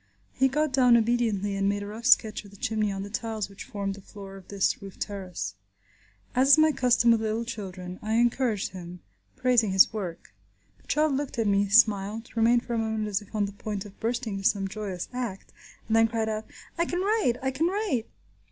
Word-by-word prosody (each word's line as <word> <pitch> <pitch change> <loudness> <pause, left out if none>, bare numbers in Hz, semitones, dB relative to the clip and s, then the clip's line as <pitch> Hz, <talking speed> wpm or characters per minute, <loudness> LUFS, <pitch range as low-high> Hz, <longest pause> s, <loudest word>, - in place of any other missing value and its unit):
He 265 - +3
got 300 +1 0
down 250 -3 +6
obediently 220 -4 0
and 195 0 +1
made 205 0 -1
a - - -6
rough 220 +4 -5
sketch 220 -6 +4
of 200 - -13
the 200 - -16
chimney 215 0 -1
on 195 0 -4
the 200 - -7
tiles 220 -1 -3
which 200 - -10
formed 200 -5 -3
the 200 - -11
floor 195 0 -11
of 190 -2 -13
this 200 -1 0
roof 195 -1 -10
terrace. 190 - -5 0.8
As 260 +2 +3
is - - +8
my 310 0 +5
custom 250 -3 +3
with 225 -1 +3
little 220 +1 -1
children, 185 -5 -7
I 215 +1 -2
encouraged 235 -3 +1
him, 180 -1 -9 0.3
praising 245 -4 +3
his 190 +3 +6
work. 185 -6 -6 0.5
The - - -28
child 305 -1 +2
looked 280 -2 -3
at 225 - +1
me, 200 0 +2
smiled, 215 +1 +3
remained 235 +1 +3
for 240 - -4
a 230 - 0
moment 220 -1 -1
as 200 0 -1
if 205 +1 -13
on 210 -1 +2
the 200 - -5
point 205 0 -5
of 200 -1 -13
bursting 230 -2 -2
into 195 - +3
some 195 -2 -2
joyous 195 -3 -5
act, 240 -6 -5 0.3
and 220 - 0
then 225 0 +5
cried 225 -1 -1
out, 215 0 -3 0.3
"I 340 - +3
can 355 +1 -1
write! 405 - +2
I 265 - +1
can 300 +6 0
write!" 370 - -1
220 Hz, 215 wpm, -27 LUFS, 200-240 Hz, 0.8 s, is